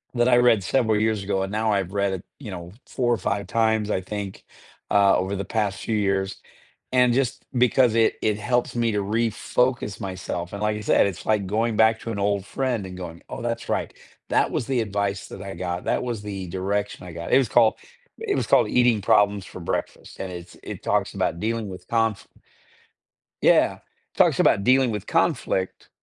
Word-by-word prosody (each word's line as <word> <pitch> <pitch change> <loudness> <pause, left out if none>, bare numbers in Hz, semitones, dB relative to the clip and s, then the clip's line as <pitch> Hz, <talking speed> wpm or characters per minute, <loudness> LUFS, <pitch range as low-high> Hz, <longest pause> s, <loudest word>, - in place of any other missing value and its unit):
that 120 +1 +3
I 120 - +5
read 120 -5 +4
several 110 +1 +2
years 110 -2 +1
ago 95 -1 -1
and 95 - -4
now 110 0 +1
I've 95 -2 -1
read 100 -1 +1
it, 90 - -6
you 120 -7 -8
know, 85 -1 -7 0.2
4 120 -2 0
or - - 0
5 100 +1 -2
times, 110 +1 +1
I - - +1
think, 100 0 -6 0.5
uh, 100 -1 +5
over 95 +2 -2
the 100 - -3
past 105 -4 -1
few 110 - -1
years, 95 -1 -1 0.5
and 125 -1 +4
just 130 -1 -1
because 125 -2 +4
it 115 -1 +4
it 105 -1 +1
helps 120 +4 0
me 115 -1 +2
to 105 - +1
refocus 115 +1 0
myself 95 -2 -5
and 100 - -5
like 105 0 +1
I - - -6
said, - - +4
it's 95 - -6
like 105 -3 +1
going 110 +3 0
back 110 0 +4
to 115 - -5
an 100 - -4
old 100 -1 0
friend 125 -6 -2
and 90 -1 -8
going, 85 -2 -8
"Oh, - - -6
that's 115 0 -3
right. - - -1 0.4
That - - +2
was - - -1
the 130 -2 +1
advice 100 -2 -2
that 95 - -9
I 100 0 -7
got, 90 -1 -4
that - - 0
was 120 -4 -3
the 95 -3 -5
direction 95 +2 -3
I 90 - -8
got." 85 0 -4
It - - +8
was 130 -5 0
called 115 -2 +4 0.4
it 435 -3 -1
was - - 0
called - - +4
Eating 120 -3 +3
Problems 100 0 +3
For - - -10
Breakfast - - -4
and 95 -1 -4
it's 85 0 -9
it - - -7
talks - - 0
about 85 - -1
dealing 110 -1 -2
with 90 - -10
confli 115 -3 0 1.2
Yeah, - - +4 0.4
talks - - +4
about 100 - +4
dealing 130 +2 +4
with 105 -2 -5
conflict, 95 0 0
105 Hz, 205 wpm, -24 LUFS, 95-115 Hz, 1.2 s, It